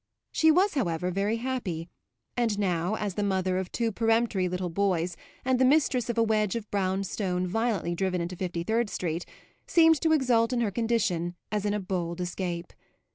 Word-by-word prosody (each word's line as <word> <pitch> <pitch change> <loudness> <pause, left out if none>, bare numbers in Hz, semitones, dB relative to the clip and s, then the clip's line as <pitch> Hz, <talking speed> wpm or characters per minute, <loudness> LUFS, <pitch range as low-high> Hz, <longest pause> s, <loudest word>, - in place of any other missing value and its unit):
She 320 - +4
was, 370 +6 +4
however, 180 - -1
very 200 +4 0
happy, 225 -10 -3 0.5
and 230 -4 +1
now, 180 0 0
as 205 -3 -3
the 205 - -2
mother 190 -2 +1
of 185 -1 -5
two 230 -1 0
peremptory 225 -4 +1
little 180 -1 -3
boys 180 -2 0 0.3
and 260 -1 +2
the - - +5
mistress 260 -3 +3
of 235 - -2
a 230 - +5
wedge 215 -2 +1
of 225 -2 -4
brown 195 -1 0
stone 185 -2 -1
violently 200 -3 0
driven 185 +1 -1
into 175 +2 -3
Fifty 175 -2 -3
third 225 +3 0
Street, 170 -2 -3 0.4
seemed 325 -2 +5
to 320 - +2
exult 250 -5 +3
in 240 - +1
her 215 -3 0
condition 200 -6 0 0.2
as 210 -1 -1
in 205 - 0
a - - 0
bold 180 -3 -3
escape. 175 -1 -4
200 Hz, 185 wpm, -28 LUFS, 180-235 Hz, 0.5 s, the